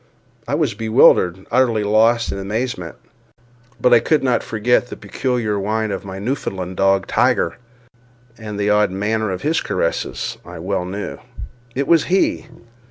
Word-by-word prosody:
I - - 0
was - - 0
bewildered, 110 -5 +3
utterly 115 -3 +2
lost 115 +3 +3
in 100 - -4
amazement—but 120 +4 -4
I 120 - +7
could 150 +3 +1
not 125 -3 +2
forget 120 +3 +1
the - - -8
peculiar 120 -6 -2
whine 110 +2 -1
of - - -4
my 95 -1 -7
Newfoundland 95 -5 -4
dog 95 0 +2
Tiger, 85 - +1 0.8
and 105 -3 -7
the 105 0 +1
odd 105 0 +3
manner 105 +3 -1
of 90 -1 -4
his 160 +2 +1
caresses 85 - -2
I - - -10
well 90 - -2
knew. 100 +3 -5 0.6
It 140 +1 -1
was 165 -2 +4
he. 190 +2 +1
110 Hz, 150 wpm, -19 LUFS, 100-120 Hz, 0.8 s, I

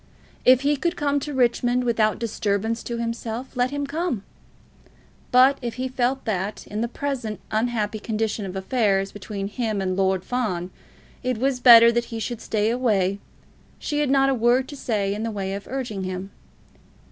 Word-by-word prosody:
If 255 0 +7
he 290 +1 +2
could 340 +5 -1
come 285 -2 0
to 295 +2 -5
Richmond 245 -1 +2
without 220 -3 +2
disturbance 220 0 -1
to 235 - -3
himself, 230 +2 -4
let 250 0 +1
him 285 +1 -3
come; 280 - -2 1.1
but 260 +2 +5
if 240 -2 -4
he 255 +1 -2
felt 260 +1 -1
that, 200 -1 -3
in 210 +1 -4
the 235 - 0
present 245 -4 -4
unhappy 220 -1 -1
condition 215 0 -2
of 185 - -7
affairs 195 -1 +1
between 200 0 -5
him 215 -1 -2
and 185 -1 -1
Lord 190 -1 +1
Fawn, 190 -8 -2 0.5
it 255 -2 -1
was 260 +2 0
better 235 -2 +9
that 235 0 0
he 230 -1 -6
should 235 0 -4
stay 215 0 0
away, 200 -6 +1 0.6
she 295 - -2
had 295 -2 +1
not 270 0 +4
a - - +3
word 245 +2 +2
to 290 - -7
say 205 -7 -1
in 210 - -4
the 230 - -2
way 195 -3 -3
of 200 +1 -6
urging 245 -7 -4
him. 185 +1 -5
230 Hz, 180 wpm, -24 LUFS, 205-255 Hz, 1.1 s, better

